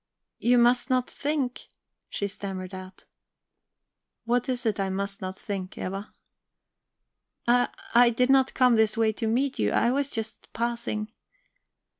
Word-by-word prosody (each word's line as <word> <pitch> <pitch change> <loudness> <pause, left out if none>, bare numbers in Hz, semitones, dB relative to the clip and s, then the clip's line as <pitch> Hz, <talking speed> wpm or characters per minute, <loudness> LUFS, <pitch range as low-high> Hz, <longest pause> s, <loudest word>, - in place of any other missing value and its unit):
"You 245 +1 +4
must 245 +2 +4
not 255 -1 +2
think..." 285 -4 -2 0.4
she 200 - -2
stammered 190 -2 -6
out. 185 0 -9 1.2
"What 245 +2 +1
is 250 -1 -2
it 215 -3 0
I 195 -1 0
must 200 +1 -3
not 185 0 -5
think, 190 -2 -5
Eva?" 195 +2 -5 1.4
"I 245 +1 +4 0.2
I 240 +1 +7
did 250 +3 +2
not 270 -1 +4
come 250 -3 +5
this 220 0 +2
way 220 -1 +3
to 225 +1 -3
meet 260 +5 0
you; - - +2
I 235 - +2
was 280 +1 0
just 225 -3 -6
passing..." 230 -2 -2
230 Hz, 145 wpm, -27 LUFS, 200-250 Hz, 1.4 s, I